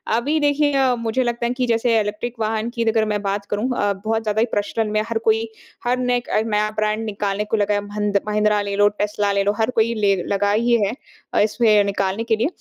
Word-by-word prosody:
अभी 290 +7 0
देखिए 290 -1 +2 0.2
मुझे 230 +3 0
लगता 240 -1 -2
है 240 - 0
कि 250 0 -1
जैसे 230 0 +2
इलेक्ट्रिक 215 +4 -3
वाहन 220 +1 -1
की 235 - 0
अगर 220 -1 +2
मैं 210 -1 -1
बात 200 0 -2
करूँ 210 +5 -1
अ, 205 0 +1
बहुत 220 +3 -2
ज़्यादा 215 0 -1
ही 230 - +4
प्रचलन 210 +1 -1
में 215 0 +1
हर 230 - 0
कोई 225 +1 +3 0.4
हर 245 +1 +1
नये 250 -1 +1
एक 240 - -7 0.2
नया 210 -1 +1
ब्रांड 215 +1 0
निकालने 205 -1 -2
को 215 +1 -1
लगा 205 0 +1
है 205 - 0
भंद 205 0 0
महिंद्रा 210 0 +2
ले 200 0 -3
लो 205 +1 +5
टेस्ला 205 0 -1
ले 200 0 +1
लो 200 - +2
हर 220 +1 +2
कोई 225 +1 +2
ले 205 -2 +2
लगा 200 0 +1
ही 235 +3 +2
है। 200 - 0 0.4
अ, - - +2
इसमें 215 -1 +3
निकालने 200 +1 -1
के 225 -1 +1
लिए 225 +5 0
215 Hz, 235 wpm, -21 LUFS, 205-230 Hz, 0.4 s, लो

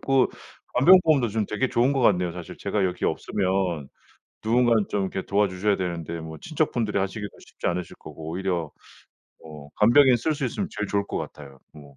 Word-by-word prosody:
그 135 -1 +3 0.5
간병보험도 155 -3 +5
좀 110 0 -1
되게 120 +6 -1
좋은 125 +4 +2
것 135 - 0
같네요. 90 -7 +3
사실 90 -1 -9
제가 100 -2 -1
여기 90 -1 -2
없으면 95 -7 -1 0.6
누군가는 115 -1 +3
좀 100 - -1
이렇게 95 0 -3
도와 100 +1 +2
주셔야 95 +2 0
되는데 85 -2 -4
뭐 80 -1 -8
친척분들이 120 -10 -1
하시기가 100 +2 -3 0.2
쉽지 - - -7
않으실 90 0 -2
거고 80 0 -9
오히려 90 -3 -2 0.7
뭐 75 -2 -12
간병인 125 +4 +6
쓸 155 +7 -1
수 145 - -3
있으면 125 - -2
제일 105 0 -2
좋을 100 0 0
것 - - -4
같아요. 70 -2 -9
뭐 70 -2 -15
100 Hz, 390 characters per minute, -25 LUFS, 85-120 Hz, 0.7 s, 간병인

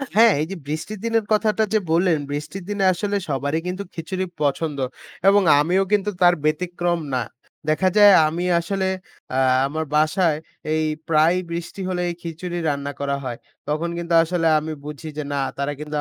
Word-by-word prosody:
হ্যাঁ, 225 0 +7
এই - - 0
যে 195 - -3
বৃষ্টির 160 +7 -4
দিনের 230 -2 +1
কথাটা 215 0 +2
যে 215 - +4
বললেন, 170 -1 +3
বৃষ্টির 150 +6 -5
দিনে 200 -1 -1
আসলে 205 +4 -2
সবারই 145 +3 -1
কিন্তু 185 +2 -3
খিচুড়ি 185 +3 -3 0.2
পছন্দ, 145 +1 0 0.5
এবং 200 +1 +6 0.2
আমিও 180 +6 +2
কিন্তু 210 0 +2
তার 175 0 +7
ব্যতিক্রম 175 +2 0
না। 125 -2 +1 0.5
দেখা 185 +5 +3
যায় 205 -1 +9
আমি 170 +3 -3 0.2
আসলে 190 +2 -1 0.4
অ্যা 130 +1 +1 0.3
আমার 160 +2 -3
বাসায় 155 +1 +2 0.4
এই 155 0 +1 0.3
প্রায়ই 165 +4 +4
বৃষ্টি 170 +3 -5
হলে 180 -1 -1
এই 170 - -4
খিচুড়ি 175 +1 -5
রান্না 140 0 -2
করা 140 0 -1
হয়। 120 -2 -4 0.3
তখন 155 +3 -1
কিন্তু 170 0 -3
আসলে 165 0 0
আমি 155 +1 -5
বুঝি 150 +1 -7
যে 150 - -2
না 140 - 0 0.2
তারা 140 +1 -1
কিন্তু 150 0 -5
170 Hz, 170 wpm, -22 LUFS, 150-190 Hz, 0.5 s, যায়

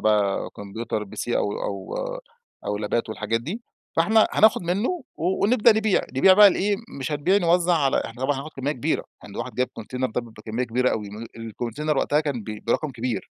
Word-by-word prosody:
بقى 105 -2 +1
كمبيوتر 105 +1 -4
PC 100 - -6
أو 100 - 0
أو 100 -2 -4 0.7
أو 105 - -1
لابات 110 +3 -1
والحاجات 110 +1 -1
دي، 200 - -5 0.3
فإحنا 215 +7 +5
هناخد 220 -4 +5
منه 225 - -1
ونبدأ 205 +7 +3
نبيع، 220 -3 +3 0.2
نبيع 185 +8 +7
بقى 205 +1 +9
لإيه، 200 +2 +1 0.2
مش 135 +3 -3
هنبيع 160 +7 +2
نوزع 175 -1 +3
على 140 -5 +2
إحنا 120 +3 -7
طبعًا 140 +1 +1
هناخد 140 +4 -6
كمية 135 +2 -1
كبيرة، 125 - -1 0.2
يعني - - -11
ده - - -3
واحد - - -6
جايب 125 0 0
كونتينر 125 +3 -3
ده 125 - -1
بكمية 115 +1 -5
كبيرة 125 +2 +1
أوي، 105 -2 -3
ام 110 +3 -8
الكونتينر 120 +6 -3
وقتها 150 +2 +2
كان 140 -6 -2
ب 105 0 -7
برقم 140 +5 0
كبير، 125 -1 -4
130 Hz, 190 wpm, -24 LUFS, 115-175 Hz, 0.7 s, بقى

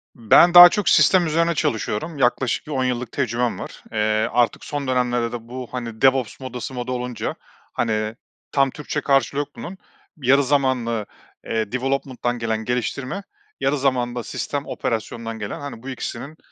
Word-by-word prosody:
Ben 120 +10 +5
daha 175 0 +12
çok 210 +1 0
sistem 185 -2 +5
üzerine 165 +1 +1
çalışıyorum, 140 +5 -2
yaklaşık 125 +1 +1
10 135 -3 0
yıllık 125 -2 -2
tecrübem 120 -2 -1
var. - - -9
Eee, 110 - -5 0.3
artık 120 -1 +1
son 145 -2 -4
dönemlerde 120 -2 0
de 115 -1 -7
bu 125 0 -7
hani 115 -3 -6
DevOps 130 -3 +2
modası 130 0 -6
moda 125 0 -4
olunca 125 -1 -3 0.4
hani 110 -1 -1 0.4
tam 135 -1 +3
Türkçe 150 0 -4
karşılığı 140 0 +2
yok 145 - -2
bunun, 190 +3 -8 0.4
bir 130 -5 -7
yarı 140 +1 +5
zamanlı, 125 -6 0 0.4
eee, 110 -1 -2
development'dan 130 -2 -2
gelen 110 -1 -2
geliştirme, 130 - -2 0.4
yarı 145 +2 +1
zamanlı 125 -3 0
da 120 - -3
sistem 145 -1 -4
operasyondan 115 0 -4
gelen 105 - -5
hani 140 -5 -8
bu 135 - -6
ikisinin 135 +4 -6
125 Hz, 160 wpm, -22 LUFS, 115-140 Hz, 0.4 s, daha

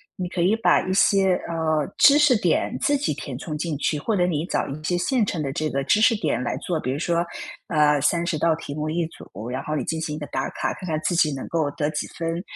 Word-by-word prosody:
你 180 -1 -4
可 175 - -2
以 190 +5 +3
把 225 - +3
一 185 - 0
些， 195 -1 +4 0.2
呃， 160 -2 0
知 285 0 +7
识 275 -7 +5
点 - - +1
自 290 - +2
己 275 - -1
填 135 -3 -6
充 150 +3 -5
进 160 0 -2
去， 150 +1 0
或 215 +9 -1
者 180 -2 +2
你 160 -2 -1
找 - - -1
一 145 +3 -7
些 175 - 0
现 240 +5 +1
成 170 -5 -3
的 140 - -2
这 155 +3 -2
个 140 -1 -1
知 205 - +3
识 225 +2 +5
点 155 - -1
来 - - -2
做， 170 -3 -2
比 130 - -2
如 140 - -3
说， 170 +1 0 0.4
呃， 150 -2 +3
30 170 +3 +1
道 160 +1 +2
题 150 -3 -7
目 155 0 -3
一 165 +1 0
组， 110 - -10
然 130 +2 -3
后 155 - -3
你 - - -1
进 160 - -2
行 155 -1 -3
一 - - -6
个 150 - -5
打 135 0 -2
卡， - - -2
看 185 - -8
看 155 -2 -1
自 175 - 0
己 155 -3 +3
能 135 - -6
够 160 -3 0
得 150 +1 -1
几 150 - -3
分， 165 +1 -3
160 Hz, 280 characters per minute, -23 LUFS, 150-180 Hz, 0.4 s, 知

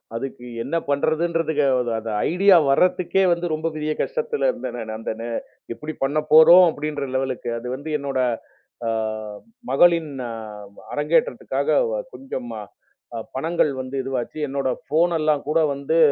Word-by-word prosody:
அதுக்கு 125 0 -6 0.2
என்ன 165 - -3
பண்றதுன்னுக்கு 160 +1 +1 0.4
அந்த 110 0 -5 0.2
ஐடியா 190 +1 +6
வர்றதுக்கே 180 +5 +3
வந்து 170 +1 0
ரொம்ப 160 +1 -2
பெரிய 155 0 -2
கஷ்டத்துல 475 0 -1
இருந்தேன். 115 - -6
அந்த 110 - -4
நே 115 - -4 0.5
எப்படி 155 +6 -7
பண்ண 145 +3 +1
போறோம்? 170 +4 +9
அப்படிங்கிற 145 -2 -4
லெவல். 130 -1 0 0.2
அது 125 - -8
வந்து 145 +4 -7
என்னோட 135 -2 -2 1.5
மகளின் 165 +1 +4 0.8
அரங்கேற்றத்துக்காகக் 160 - 0
கொஞ்சம் 130 - -6 0.9
பணங்கள் 160 +1 +1
வந்து 130 +1 -7
இதுவாச்சு. 135 +2 -4
என்னோட 135 -1 -1 0.2
ஃபோன் 170 +3 +2
எல்லாம் 155 -2 +1
கூட 165 +2 +3
வந்து 140 +4 -1
155 Hz, 120 wpm, -22 LUFS, 135-170 Hz, 1.5 s, போறோம்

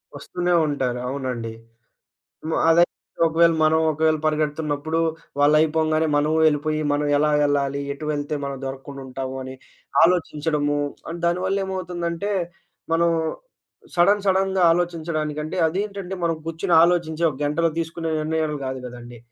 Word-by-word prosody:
వస్తూనే 180 0 -2
ఉంటారు. 130 -4 -1
అవునండి. 125 -4 -4 0.9
హ్మ్. 160 - -1
అదయితే 170 +1 +4 0.3
ఒకవేళ 165 +1 +4
మనం, 160 +1 +4
ఒకవేళ 155 +1 +2
పరిగెడుతున్నప్పుడు, 155 0 -1 0.4
వాళ్ళయిపోంగానే 155 +1 +3
మనము 150 +2 +2
వెళ్ళిపోయి, 155 0 +1
మనం 145 0 0
ఎలా 150 +1 +2 0.2
ఎళ్ళాలి, 140 -1 0
ఎటు 145 +2 -8
వెళ్తే 145 +1 -3
మనం 140 -1 -4
దొరక్కుండా 135 +1 -7
ఉంటాము, 130 0 -5
అని 130 0 -7 0.5
ఆలోచించడము, 150 -4 +1 0.3
అండ్ 170 +1 -6
దానివల్లేమవుతుందంటే, 180 0 -2 0.6
మనం 170 +1 +3 0.9
సడెన్ 200 +4 +4
సడెన్‍గా 190 0 +2
ఆలోచించడానికి 160 -3 -2
అంటే, 155 +4 -5
అదేంటంటే 195 +1 -4
మనం 165 -1 +1
గూర్చొని 165 +1 +1
ఆలోచించి, 170 -2 0
ఒక 135 - -9
గంటలో 165 +3 +1
తీసుకునే 165 0 -3
నిర్ణయాలు 155 -1 -1
కాదు 130 0 -3
గదండీ. 120 -1 -10
155 Hz, 120 wpm, -23 LUFS, 145-170 Hz, 0.9 s, అదయితే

